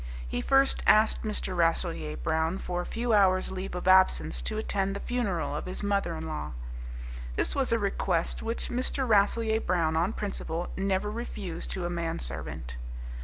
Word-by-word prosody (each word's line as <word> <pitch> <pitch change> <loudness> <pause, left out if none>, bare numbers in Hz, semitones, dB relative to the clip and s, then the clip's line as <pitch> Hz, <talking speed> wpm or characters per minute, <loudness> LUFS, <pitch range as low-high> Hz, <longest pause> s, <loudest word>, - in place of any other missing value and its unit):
He 90 - -2
first 270 - +3
asked 215 +1 +5
Mr. 210 -4 -2
Rasselyer 85 - 0
Brown 160 - 0
for 180 -2 -2
a - - -6
few 235 0 -1
hours' 185 -3 +4
leave 190 0 -4
of 180 - -4
absence 185 0 +5
to 215 - -2
attend 195 -2 -1
the - - -3
funeral 200 -13 -1
of 150 - -4
his 185 - -4
mother 200 -1 +1
in 80 - -5
law. 75 -3 -4 0.8
This - - +1
was 270 -2 +1
a 230 - +4
request 195 -5 0
which 230 +1 -2
Mr. 255 +2 0
Rasselyer 220 +1 +3
Brown, 165 -3 +1
on 175 +6 +1
principle, 175 -5 -3
never 195 +1 0
refused 200 -7 -5
to 185 -2 -3
a - - -1
man 170 -1 -2
servant. - - -5
190 Hz, 170 wpm, -29 LUFS, 165-215 Hz, 0.8 s, asked